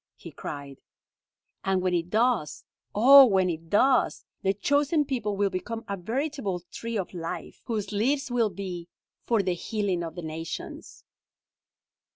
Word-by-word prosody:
he - - -11
cried. 140 -2 -8 0.8
"And 190 -1 +1
when 185 0 0
it 170 0 0
does, 215 - +1 0.3
O 270 +6 +10
when 190 -4 +2
it 165 0 -7
does, 255 +6 +3 0.2
the 195 - +2
'chosen 285 - +1
people' 225 -7 -2
will 200 -1 +1
become 225 +5 -4
a 200 - -2
veritable 220 - -3
tree 230 -1 -4
of 190 -2 -4
life, 165 -2 -6
whose 215 -4 -3
leaves 260 +6 0
will 235 -3 +2
be 180 -4 -6 0.4
'for 225 -4 +2
the 185 -1 0
healing 190 -1 -2
of 165 0 -6
the 175 - -6
nations.'" 160 +1 -7
200 Hz, 150 wpm, -27 LUFS, 180-235 Hz, 0.8 s, O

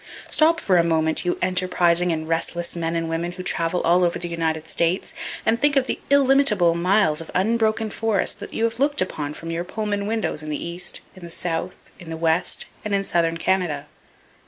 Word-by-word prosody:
Stop 325 +1 +3
for 185 - +2
a 170 - +5
moment, 160 0 +1
you 175 - 0
enterprising 180 -1 +2
and 160 -1 -3
restless 170 +1 -2
men 165 -1 -2
and 165 0 -1
women 165 +2 -2
who 185 - -7
travel 170 0 0
all 175 +2 +3
over 175 0 +1
the 175 - -4
United 160 -2 -2
States, 170 +3 0 0.3
and 225 +1 +2
think 290 0 +3
of 270 -2 +3
the - - -2
illimitable 270 -10 +4
miles 170 -2 +2
of 165 - -10
unbroken 220 +2 +1
forest 215 -2 0
that 205 - -8
you 225 - -2
have 230 +1 0
looked 285 +1 +1
upon 150 -5 -2
from 165 0 -7
your 165 +1 -2
Pullman 205 +1 -3
windows 220 -8 -1
in 155 - -7
the 150 - -2
East, 175 +1 -3
in 185 - -14
the 170 - -8
South, 170 +1 -4
in 175 - -10
the 165 - -4
West 165 +1 +1 0.2
and 210 -1 -1
in 195 - 0
southern 165 -3 +1
Canada. 165 -5 0
175 Hz, 205 wpm, -23 LUFS, 165-210 Hz, 0.3 s, a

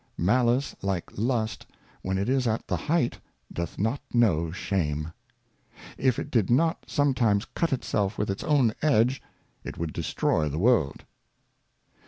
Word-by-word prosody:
Malice, 120 +8 +2
like 95 -3 -2
Lust, 110 0 -1 0.3
when 95 0 -2
it 100 - -1
is 130 -1 +1
at 110 0 -1
the - - 0
Height, 150 -5 0 0.3
doth 85 -2 -4
not 115 +7 -1
know 85 -10 +2
Shame. 80 -5 -2 0.8
If 130 -3 +1
it 145 - -5
did 110 -6 +2
not 160 +7 +2
sometimes 125 -7 +2
cut 170 - -2
itself 105 -6 -1
with 105 -1 0
its 95 - -5
own 135 -7 +3
Edge, 130 -3 +3 0.4
it - - -7
would 80 -1 -3
destroy 75 -1 0
the 75 - -4
World. 100 - +2
110 Hz, 145 wpm, -27 LUFS, 95-130 Hz, 0.8 s, own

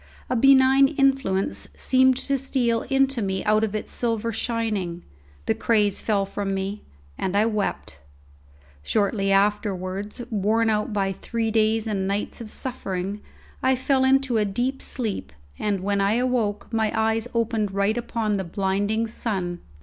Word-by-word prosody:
A - - +2
benign 270 +2 +6
influence 270 -9 +1
seemed 260 0 +3
to 275 +1 0
steal 245 -4 0
into 270 -2 +2
me 190 -1 -2
out 215 +1 +3
of 215 -1 -1
its 215 - -4
silver 230 -1 -1
shining; 210 -8 -2 0.4
the - - +2
craze 210 -4 +1
fell 200 -3 +1
from 195 0 -3
me, 195 +2 -3 0.4
and 190 +1 -1
I 210 +2 +4
wept. 210 - -2 0.8
Shortly 200 - 0
afterwards, 200 +1 0
worn 220 +2 +2
out 210 +1 -1
by 195 -2 0
three 225 +3 -3
days 220 0 +2
and 200 -3 -1
nights 200 +4 -3
of 220 - -7
suffering, 200 -6 -2 0.4
I 260 0 +3
fell 260 +1 +1
into 265 -2 +3
a - - +3
deep 245 +7 -1
sleep, 210 - -4 0.3
and 200 -3 -1
when 200 +1 0
I 200 +1 +2
awoke 235 -4 -1
my 220 -1 +1
eyes 220 +1 +1
opened 225 -3 0
right 200 +2 +1
upon 225 -3 -1
the 190 - -2
blinding 200 +4 0
sun. 190 -6 -3
215 Hz, 150 wpm, -24 LUFS, 200-240 Hz, 0.8 s, benign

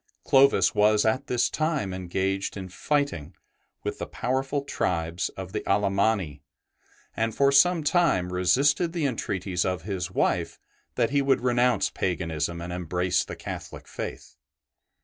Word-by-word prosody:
Clovis 135 -8 +4
was 105 0 +3
at 130 +5 0
this 125 -1 +2
time 150 - -1
engaged 95 +2 -2
in 95 -1 -6
fighting 90 - -2 0.5
with - - -4
the - - -4
powerful 135 +3 -2
tribes 85 -9 -2
of 95 -1 -6
the 105 - -3
Alemanni, 100 -6 +1 0.7
and 115 -1 -1
for 140 0 +4
some 165 +4 +4
time 145 - +2
resisted 140 - +2
the 165 -4 -1
entreaties 95 -8 -2
of 90 -3 -2
his 95 -2 -3
wife - - 0 0.4
that - - +1
he 140 0 +2
would 135 -1 +2
renounce 125 0 +2
paganism 85 -2 -2
and 85 +1 -5
embrace 90 +1 0
the - - -8
Catholic - - -8
faith. - - -7
100 Hz, 140 wpm, -26 LUFS, 90-135 Hz, 0.7 s, Clovis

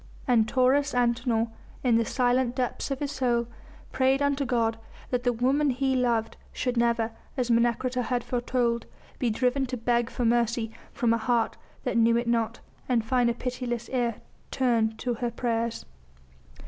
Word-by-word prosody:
And 230 -4 +4
Taurus 270 +4 +2
Antinor, 235 -1 +1 0.3
in 245 -3 +3
the 230 - +2
silent 250 0 +1
depths 255 +1 -2
of 275 - -1
his 285 -1 -2
soul, 245 -4 +1 0.5
prayed 265 +1 +2
unto 285 -1 +1
God 230 -2 0 0.3
that 250 -1 +1
the 245 - +2
woman 265 +5 +2
he 265 +1 +1
loved 235 -3 0
should 250 -1 -2
never 235 -1 +1 0.3
as 245 -2 0
Menecreta 240 +2 +2
had 245 0 -1
foretold 240 -1 -1 0.3
be 245 - +1
driven 255 +4 +1
to 250 0 -4
beg 235 0 +1
for 245 - -2
mercy 235 -1 +1 0.2
from 235 -4 +1
a 230 - +1
heart 235 -1 +1 0.3
that - - -1
knew 230 0 +4
it 235 0 -1
not 230 -1 0 0.3
and 235 -3 +2
find 245 0 +2
a 235 - -1
pitiless 245 -1 -4
ear 240 -3 0 0.3
turned 230 -4 +1
to 245 - -2
her 240 +1 -2
prayers. 235 -1 -2
240 Hz, 165 wpm, -27 LUFS, 230-255 Hz, 0.5 s, And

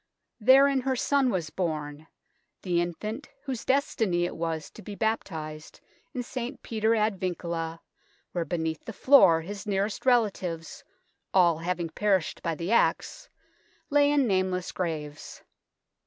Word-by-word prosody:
Therein 270 +4 +6
her 260 0 0
son 275 +1 +2
was 170 -8 -2
bom 155 -3 -3 0.6
the 175 -2 +1
infant 215 - -5
whose 265 -5 -4
destiny 225 - +1
it - - -4
was 160 -2 -3
to - - -12
be 205 +2 -8
baptised 160 -8 -3 0.3
in 250 - -4
St. 250 +2 -6
Peter 220 0 +1
ad 215 -3 +1
Vincula, 170 -2 -3 0.5
where 175 - -1
beneath 160 -2 -3
the 225 - -6
floor 195 -10 +6
his 200 +5 -7
nearest 200 +1 -1
relatives, 190 -9 0 0.5
all 170 -4 +5
having 170 0 -2
perished 195 -4 0
by 165 -1 -2
the 170 +6 -4
axe, - - +1 0.6
lay 285 0 +5
in 285 -2 +3
nameless 185 -3 0
graves. 155 -5 -5
185 Hz, 135 wpm, -27 LUFS, 165-230 Hz, 0.6 s, Therein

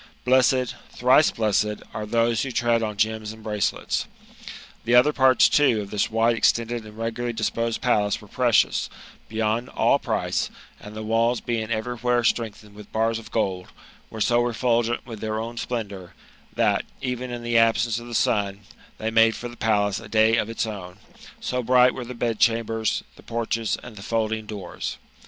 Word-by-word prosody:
Blessed, 130 0 +3
thrice 130 +5 +4
blessed, 105 -1 0
are 105 0 -4
those 115 0 +2
who 135 - -2
tread 120 -1 +1
on 105 -2 -3
gems 110 0 0
and 110 0 -13
bi:acelets! 105 -1 -1 0.8
The 120 - +2
other 130 +5 +6
parts, 130 -1 +5
too, 130 -7 +3
of 100 - -8
this 105 - 0
wide 115 +1 +2
extended 115 0 +1
and 105 0 -13
regularly 115 +1 -3
disposed 115 +1 -1
palace 105 -5 +1
were 105 - -14
precious, 120 +1 +2 0.4
beyond 110 +2 -1
all - - +2
price; - - -1 0.3
and 105 +1 -11
the 110 - -5
walls 115 +2 +1
being 115 -2 -3
every 115 +2 -2
where 120 +1 +1
strengthened 110 -3 -1
with 105 0 -13
bars 115 +1 0
of 115 - -12
gold, 95 -5 -1 0.4
Were 110 - -7
so 120 +2 +3
refulgent 120 0 0
with 115 -4 -8
their 110 0 -2
own 115 +1 -5
sj^endoux 100 -7 -5 0.4
that, - - +2 0.2
even 125 -1 -3
in 120 -1 -6
the 120 -1 +3
absence 115 0 +2
of 120 - -10
the 120 - -5
sun, 100 -6 +1 0.4
tbey 110 +1 -2
miade 115 -1 +5
for 120 - -6
the 120 - -11
palace 105 -3 +1
a - - -11
day 110 0 +4
of 110 - 0
its 115 - -2
own, 95 -5 -7 0.4
so 125 0 -2
bright 125 +1 +5
were 125 - -6
the 125 +1 -7
bedchambers, 115 -1 0
the - - -14
porches, 115 -1 -2
and 120 -4 -11
the - - -8
folding 110 0 -2
doors. 100 -5 -6
115 Hz, 180 wpm, -24 LUFS, 110-120 Hz, 0.8 s, other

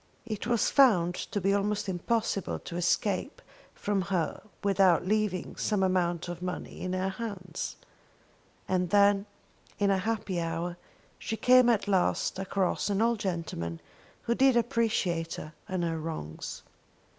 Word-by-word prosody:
It 215 -1 -4
was 235 -2 +2
found 190 -11 +5
to 205 - -3
be 195 +1 +2
almost 205 +1 0
impossible 195 +2 -1
to 170 - -8
escape 185 - 0 0.4
from 205 -1 0
her 185 -4 -1 0.2
without 195 -3 +4
leaving 205 -2 0
some 205 -3 +1
amount 175 -2 +1
of 175 0 -6
money 180 0 -5
in 185 0 -2
her 185 +1 0
hands. 190 -5 -5 0.9
And 180 -1 +1
then, 200 0 +4 0.5
in 200 -1 +2
a 195 - +2
happy 205 -3 -2
hour, 165 +1 -3 0.4
she 225 - -3
came 250 0 +6
at 215 -3 +2
last 190 -1 +1
across 195 +1 0
an 200 -1 +1
old 230 0 +2
gentleman 165 - -3 0.4
who 235 - +1
did 265 0 +4
appreciate 220 -9 0
her 155 - -8 0.2
and 185 -2 -1
her 165 -1 -1
wrongs. 155 - -6
190 Hz, 145 wpm, -29 LUFS, 175-215 Hz, 0.9 s, came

